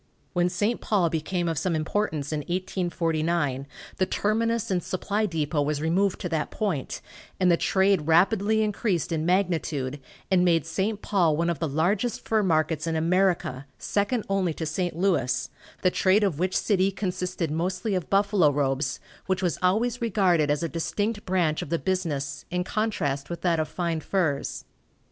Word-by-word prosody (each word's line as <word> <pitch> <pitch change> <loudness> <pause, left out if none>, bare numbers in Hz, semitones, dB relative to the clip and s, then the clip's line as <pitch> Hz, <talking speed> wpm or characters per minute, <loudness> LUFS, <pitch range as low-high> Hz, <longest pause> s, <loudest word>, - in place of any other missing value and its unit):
When 175 -1 +2
St. 205 +6 -1
Paul 185 -6 +1
became 170 +2 -1
of 165 -3 0
some 180 -3 0
importance 155 -2 -1
in 155 - 0
1849 165 -4 -1 0.3
the 185 - +1
terminus 225 +2 0
and 180 -1 +1
supply 205 +4 -1
depot 155 -3 -1
was 145 0 0
removed 180 +5 +1
to 180 - -3
that 160 -3 -1
point, 190 - -3 0.4
and 185 -1 +4
the - - +6
trade 190 -3 +2
rapidly 200 +6 +3
increased 205 -5 -1
in 160 0 -1
magnitude, 160 -7 0 0.3
and 180 -1 +4
made 165 -4 +3
St. 200 +6 -2
Paul 170 -7 +2
one 170 +1 +1
of 165 - -4
the 165 - 0
largest 190 - 0
fur 220 -1 +3
markets 160 -3 +1
in 165 - 0
America, 170 -4 +1
second 210 +3 -1
only 190 -5 0
to 160 - -3
St. 175 +1 -2
Louis, 175 -8 0 0.3
the 185 - +4
trade 195 +3 +3
of 180 -7 0
which 185 +1 +1
city 195 -2 +2
consisted 180 -4 -3
mostly 185 +6 -1
of 185 -3 -2
buffalo 200 -5 +4
robes, 135 -1 0 0.3
which 190 0 0
was 175 - 0
always 225 +7 +1
regarded 185 -9 +2
as 145 +2 +1
a - - +1
distinct 200 +7 -2
branch 175 -4 +1
of - - -6
the 170 - +1
business, 150 -7 -2
in 180 0 -1
contrast 180 -11 -1
with 170 - -5
that 170 -3 +2
of 155 - 0
fine 170 -3 -2
furs. 155 -4 -1
175 Hz, 170 wpm, -26 LUFS, 160-195 Hz, 0.4 s, the